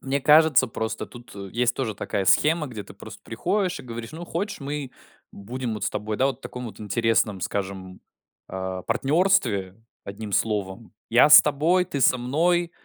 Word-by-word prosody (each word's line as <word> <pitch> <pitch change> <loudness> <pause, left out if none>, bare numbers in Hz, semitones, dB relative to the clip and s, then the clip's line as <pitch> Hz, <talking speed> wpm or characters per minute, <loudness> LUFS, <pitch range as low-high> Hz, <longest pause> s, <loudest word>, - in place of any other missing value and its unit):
Мне 135 +1 -2
кажется, 150 -1 +5
просто 110 -1 -4
тут, 120 -3 -14
э, 100 -1 -8
есть 120 0 +1
тоже 120 -5 -3
такая 100 -1 -3
схема, 155 - +3
где 115 -6 -7
ты - - -13
просто - - -12
приходишь 185 - -2
и - - -13
говоришь: 115 -2 -8
"Ну, 165 +2 -7
хочешь, 185 +4 -4
мы 140 -1 -5 0.4
будем 120 +3 -5
вот 105 -2 -4
с - - -1
тобой, 105 0 -4
да, 130 - +2
вот 135 -3 -2
в - - -36
таком 125 -2 -7
вот 110 - -11
интересном, 105 -1 0
скажем, 95 0 -5 0.5
э, 95 0 -5
партнерстве, 125 - +1 0.3
одним 100 +1 -7
словом. 105 +1 -2 0.2
Я 120 +5 +6
с 150 - +11
тобой, 160 +5 +2
ты 155 -6 -5
со 130 - +4
мной. 170 +7 +1
120 Hz, 180 wpm, -24 LUFS, 105-150 Hz, 0.5 s, с